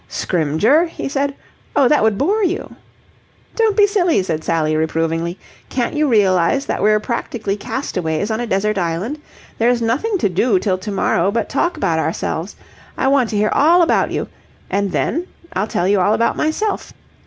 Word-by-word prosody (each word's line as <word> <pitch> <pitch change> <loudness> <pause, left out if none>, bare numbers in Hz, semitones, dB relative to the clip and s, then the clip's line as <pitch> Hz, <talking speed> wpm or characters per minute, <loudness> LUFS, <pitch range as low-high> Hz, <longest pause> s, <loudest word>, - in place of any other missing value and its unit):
"Scrymgeour?" 180 - +2
he 330 - -6
said. 275 0 -1 0.4
"Oh, 265 - +5
that 295 - +3
would 220 -2 +2
bore 405 - +1
you." 375 +1 -2 0.8
"Don't 450 -2 +2
be 415 - +7
silly," 360 - +2
said 160 -3 -3
Sally 155 -2 0
reprovingly. 165 +2 -1 0.3
"Can't 245 -2 -1
you 300 0 +1
realize 205 +2 +2
that - - -2
we're 215 +1 +4
practically 215 -2 -3
castaways 195 - -3
on 220 - -1
a 240 - -3
desert 210 0 0
island? 185 - -3 0.4
There's 240 +1 +3
nothing 260 - 0
to 340 - +1
do 195 +3 +2
till 185 -1 -1
to 205 +3 -5
morrow 190 -2 +1
but 225 +1 -1
talk 340 +6 0
about 165 -5 0
ourselves. 160 +3 -3 0.4
I 265 - +2
want 270 -4 +2
to 210 - -2
hear 210 +1 +1
all 340 +5 +5
about 330 - +2
you, - - -3 0.4
and 200 0 0
then 350 +3 -1 0.3
I'll 210 +3 -1
tell 180 -4 -1
you 200 -1 +3
all 205 +4 +3
about 230 - +1
myself. 395 +7 -2
215 Hz, 175 wpm, -18 LUFS, 185-285 Hz, 0.8 s, be